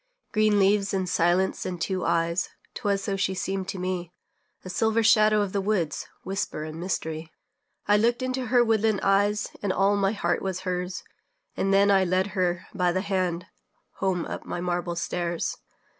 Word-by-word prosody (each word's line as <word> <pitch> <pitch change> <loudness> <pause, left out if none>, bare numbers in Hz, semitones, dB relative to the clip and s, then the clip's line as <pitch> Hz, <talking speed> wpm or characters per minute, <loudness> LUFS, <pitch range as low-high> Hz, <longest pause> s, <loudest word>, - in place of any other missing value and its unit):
Green 215 -1 +3
leaves 195 0 +3
and 190 -1 -1
silence 175 +2 +1
and 180 -2 -4
two 185 +1 -1
eyes 170 +1 +1 0.2
'Twas 200 -1 -1
so 200 -1 -1
she 190 -1 0
seemed 190 +1 -2
to 195 - -4
me; 180 -1 -3 0.5
A - - -6
silver 220 +4 +2
shadow 215 -1 +5
of 200 -2 -2
the 200 - +1
woods, 190 -6 -1 0.2
Whisper 195 -4 -3
and 155 +1 -7
mystery. 160 -3 -3 0.6
I 205 0 +5
looked 235 +4 +2
into 255 0 -2
her 245 +1 +5
woodland 220 -2 +2
eyes, 205 +2 +2
And 200 - 0
all 195 +2 +3
my 200 0 +1
heart 175 -5 0
was 190 -1 -3
hers; 180 0 -3 0.5
And 195 - 0
then 200 +1 +5
I 195 -1 +5
led 185 +2 +1
her 180 -1 0
by 180 -3 +2
the 185 +1 0
hand 185 -3 -1 0.5
Home 185 -3 0
up - - -6
my - - -4
marble 175 0 -2
stairs. 170 0 -2
190 Hz, 175 wpm, -26 LUFS, 180-205 Hz, 0.6 s, shadow